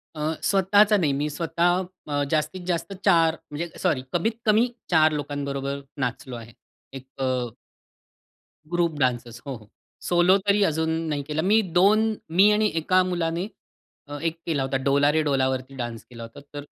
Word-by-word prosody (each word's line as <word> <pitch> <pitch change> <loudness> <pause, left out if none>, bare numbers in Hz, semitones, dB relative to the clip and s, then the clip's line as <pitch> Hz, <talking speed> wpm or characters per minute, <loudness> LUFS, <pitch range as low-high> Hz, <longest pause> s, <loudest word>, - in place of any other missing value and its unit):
अ, 155 +1 -1
स्वतःचा 205 +2 +4
नाही. 160 -7 +1
मी 145 +2 -1
स्वतः 170 +4 0 0.2
अ, 145 -1 0
जास्तीत 175 +4 -1
जास्त 175 +2 -2
4 165 -4 +4 0.2
म्हणजे 165 +4 -4
सॉरी, 130 - +1
कमीत-कमी 220 +4 +2 0.2
4 155 -2 +5
लोकांबरोबर 140 -1 -3 0.2
नाचलो 125 0 -3
आहे. 115 -1 -10 0.4
एक 135 -1 -8 0.2
अ - - +1 1.4
ग्रुप 170 -3 0
डांसेस 120 -2 -1
हो, 135 -2 -4 0.5
सोलो 175 +2 +4
तरी 200 +1 +4
अजून 160 -3 +1 0.2
नाही 145 -2 -1
केला 155 0 -1
मी. 210 +6 +4
2 205 +4 +3 0.2
मी 200 +3 +6
आणि 210 +1 +3
एका 185 +3 +3
मुलाने 175 0 -2 0.6
अ, 145 0 -6
एक 165 0 -1
केला 150 -5 0
होता 135 0 -1
"डोला 140 +1 +4
रे 160 +1 +2
डोला 135 -3 +1
वरती" 130 +1 -4
डान्स 120 -4 -5
केला 115 -2 -9
होता. 115 0 -11
तर 145 0 -6
160 Hz, 155 wpm, -24 LUFS, 140-185 Hz, 1.4 s, मी